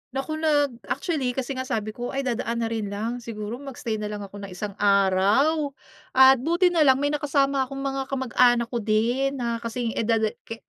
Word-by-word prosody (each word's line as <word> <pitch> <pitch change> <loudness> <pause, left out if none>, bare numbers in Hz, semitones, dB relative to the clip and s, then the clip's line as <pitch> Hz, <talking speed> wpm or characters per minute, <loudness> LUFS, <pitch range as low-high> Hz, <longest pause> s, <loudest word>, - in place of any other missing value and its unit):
Naku, 310 +4 -3
nag 295 -3 +2 0.2
actually 275 -4 -2
kasi 265 0 -3
nga 260 -1 -4
sabi 215 -2 -2
ko 245 +4 -6
ay 275 - -1
dadaan 235 -2 -2
na 225 - -2
rin 220 -2 -2
lang, 220 +5 -3
siguro 230 0 -6
mag-stay 245 -5 -5
na 210 - -3
lang 210 -1 -5
ako 200 +1 -10
ng 200 - -7
isang 205 +3 -4
araw. 200 +10 +3 0.5
At 265 0 +7
buti 345 +6 +2
nalang 300 -6 +5
may 285 +2 0
nakasama 275 -2 +1
akong 275 +1 -6
mga 270 -1 -2
kamag-anak 245 -3 +2
ko 240 - -1
din 235 +6 +1
na 235 -3 -2
kasing 230 0 -3
edad 225 0 +1 0.2
ka 225 - -5
245 Hz, 190 wpm, -25 LUFS, 220-275 Hz, 0.5 s, At